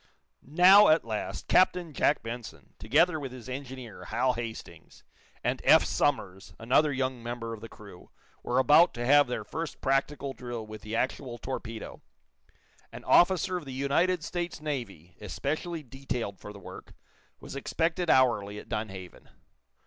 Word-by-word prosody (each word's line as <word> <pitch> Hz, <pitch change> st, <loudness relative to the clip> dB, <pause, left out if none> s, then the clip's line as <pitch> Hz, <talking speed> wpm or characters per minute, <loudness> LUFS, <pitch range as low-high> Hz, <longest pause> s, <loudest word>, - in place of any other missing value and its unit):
Now, 185 Hz, +8 st, +7 dB
at 155 Hz, -3 st, +4 dB
last, 110 Hz, -2 st, -4 dB
Captain 180 Hz, -3 st, +3 dB
Jack 145 Hz, 0 st, +1 dB
Benson, 115 Hz, 0 st, -8 dB
together 160 Hz, +9 st, +2 dB
with 135 Hz, -3 st, -6 dB
his 125 Hz, -1 st, -10 dB
engineer, 130 Hz, -3 st, -8 dB
Hal 125 Hz, +3 st, +1 dB
Hastings, 115 Hz, -1 st, -8 dB, 0.4 s
and -, -, -1 dB
Eph -, -, +6 dB
Somers, 95 Hz, -, -1 dB
another 130 Hz, +6 st, +2 dB
young 130 Hz, -2 st, -2 dB
member 115 Hz, -1 st, -5 dB
of 110 Hz, -, -9 dB
the 115 Hz, -, -9 dB
crew, 100 Hz, -4 st, -14 dB, 0.3 s
were 125 Hz, -, -2 dB
about 150 Hz, +6 st, +5 dB
to 120 Hz, 0 st, -3 dB
have 145 Hz, +2 st, +6 dB
their 125 Hz, -, -3 dB
first 165 Hz, -1 st, -6 dB
practical 135 Hz, 0 st, -1 dB
drill 120 Hz, -3 st, -6 dB
with 110 Hz, 0 st, -10 dB
the 110 Hz, +1 st, -5 dB
actual 125 Hz, 0 st, -2 dB
torpedo. 115 Hz, -2 st, -7 dB, 0.9 s
An -, -, -10 dB
officer 185 Hz, +1 st, +3 dB
of 170 Hz, -, -8 dB
the 135 Hz, -, -7 dB
United 155 Hz, +6 st, +1 dB
States 175 Hz, 0 st, -4 dB
Navy, 115 Hz, -, -6 dB
especially 155 Hz, +9 st, -4 dB
detailed 125 Hz, -6 st, -5 dB
for 105 Hz, -, -9 dB
the 105 Hz, -, -11 dB
work, 100 Hz, -, -12 dB, 0.4 s
was -, -, -10 dB
expected 165 Hz, +4 st, -1 dB
hourly 105 Hz, -6 st, +3 dB
at -, -, -11 dB
Dunhaven. 95 Hz, -4 st, -6 dB
130 Hz, 150 wpm, -28 LUFS, 115-150 Hz, 0.9 s, Now